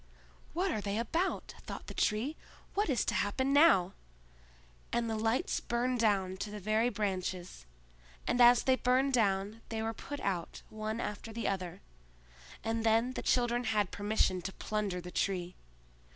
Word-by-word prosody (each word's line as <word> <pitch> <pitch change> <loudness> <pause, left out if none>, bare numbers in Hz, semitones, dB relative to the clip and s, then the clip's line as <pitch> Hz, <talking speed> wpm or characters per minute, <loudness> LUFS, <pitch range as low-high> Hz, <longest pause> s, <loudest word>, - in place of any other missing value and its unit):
"What 370 +2 +1
are 215 - -1
they 200 +1 -2
about?" 325 - -1
thought - - -6
the - - -7
Tree. 230 +9 0 0.4
"What 410 -3 +1
is 255 -5 +1
to - - 0
happen 260 +7 +1
now!" 285 - +6 1.0
And 235 -1 0
the 225 - -1
lights 225 +8 0
burned 245 +1 -1
down 195 -4 +2
to 210 - -4
the 210 0 -6
very 215 +4 +2
branches, 185 - -3 0.6
and 245 - +2
as 240 0 +7
they 260 - +4
burned 260 +2 +2
down 205 -1 +1
they 220 -1 -2
were 225 0 -1
put 290 +6 -7
out 180 -4 -3
one 215 +1 -3
after 210 0 -4
the 230 +1 -3
other, 185 -3 -3 0.8
and 225 0 -1
then 225 +2 +3
the - - -4
children 240 0 +1
had 210 -4 +1
permission 205 -3 +1
to 190 +2 -5
plunder 205 -4 -2
the 180 +1 -8
Tree. 180 -2 -1
220 Hz, 165 wpm, -32 LUFS, 200-245 Hz, 1.0 s, as